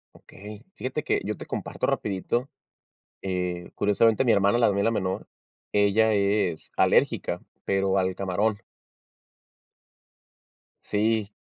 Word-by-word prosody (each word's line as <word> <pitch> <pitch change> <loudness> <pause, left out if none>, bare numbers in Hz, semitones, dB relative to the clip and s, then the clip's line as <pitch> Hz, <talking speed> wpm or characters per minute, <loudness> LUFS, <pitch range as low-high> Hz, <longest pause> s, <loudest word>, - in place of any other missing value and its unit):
Okey. 105 +3 -12
Fíjate 130 +4 -3
que - - 0
yo - - -3
te - - -8
comparto - - -3
rapidito, 105 +6 -1 0.7
eh, 90 -2 -3
curiosamente 110 +4 +3
mi 120 - +4
hermana, 100 +4 +3
la 115 -3 +4
mía, 100 +1 0
la 115 - +3
menor, 95 -4 -2 0.4
ella 105 +2 +3
es 100 -4 0
alérgica, - - +2 0.2
pero 95 0 +1
al 95 0 0
camarón. 100 +3 -1 2.2
Sí, 105 0 0
100 Hz, 115 wpm, -26 LUFS, 95-110 Hz, 2.2 s, mi